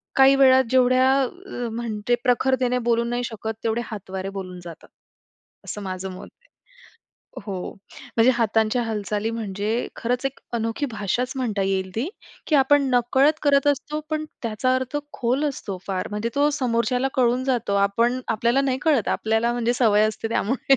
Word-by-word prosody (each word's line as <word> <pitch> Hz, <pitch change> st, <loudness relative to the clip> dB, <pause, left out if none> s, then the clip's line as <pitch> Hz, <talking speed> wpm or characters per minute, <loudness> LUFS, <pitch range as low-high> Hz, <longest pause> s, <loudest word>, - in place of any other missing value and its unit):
काही 270 Hz, 0 st, +7 dB
वेळा 260 Hz, -1 st, +6 dB
जेवढ्या 255 Hz, +1 st, +4 dB, 0.6 s
म्हणजे, 230 Hz, 0 st, -1 dB
प्रखरतेने 250 Hz, 0 st, +2 dB
बोलू 235 Hz, 0 st, +3 dB
नाही 240 Hz, +1 st, -2 dB
शकत 225 Hz, -1 st, -5 dB
तेवढे 230 Hz, +1 st, 0 dB
हातवारे 190 Hz, -3 st, -6 dB
बोलून 185 Hz, -2 st, -6 dB
जातात. 170 Hz, -2 st, -11 dB, 0.8 s
असं 210 Hz, -, -6 dB
माझं 190 Hz, 0 st, -4 dB
मत 185 Hz, -, -9 dB
आहे. -, -, -29 dB, 1.0 s
हो. 200 Hz, -, -4 dB, 0.6 s
म्हणजे 230 Hz, +2 st, +6 dB
हातांच्या 225 Hz, +1 st, +1 dB
हालचाली 210 Hz, 0 st, -2 dB
म्हणजे 220 Hz, 0 st, -2 dB
खरंच 245 Hz, +2 st, -2 dB
एक 270 Hz, -, -6 dB
अनोखी 230 Hz, +5 st, -1 dB
भाषाच 220 Hz, +4 st, -1 dB
म्हणता 220 Hz, -6 st, -1 dB
येईल 190 Hz, -1 st, -1 dB
ती 235 Hz, +6 st, 0 dB, 0.4 s
की 310 Hz, -, +1 dB
आपण 280 Hz, +1 st, +4 dB
नकळत 265 Hz, +5 st, +3 dB
करत 280 Hz, -1 st, +3 dB
असतो 295 Hz, +2 st, -1 dB
पण 310 Hz, 0 st, -1 dB, 0.2 s
त्याचा 230 Hz, +3 st, 0 dB
अर्थ 260 Hz, +2 st, -3 dB, 0.2 s
खोल 255 Hz, +4 st, 0 dB
असतो 200 Hz, -8 st, -6 dB
फार. 190 Hz, -2 st, -2 dB
म्हणजे 210 Hz, +2 st, -2 dB
तो 290 Hz, +1 st, +4 dB
समोरच्याला 250 Hz, 0 st, +1 dB
कळून 250 Hz, 0 st, +2 dB
जातो. 245 Hz, -6 st, 0 dB
आपण 235 Hz, +5 st, +1 dB
आपल्याला 235 Hz, +4 st, +2 dB
नाही 265 Hz, -2 st, 0 dB
कळत. 290 Hz, -9 st, +2 dB
आपल्याला 225 Hz, +2 st, +1 dB
म्हणजे 240 Hz, 0 st, 0 dB
सवय 215 Hz, -4 st, +4 dB
असते 220 Hz, +1 st, -4 dB
त्यामुळे 250 Hz, +4 st, +1 dB
235 Hz, 155 wpm, -23 LUFS, 215-260 Hz, 1.0 s, काही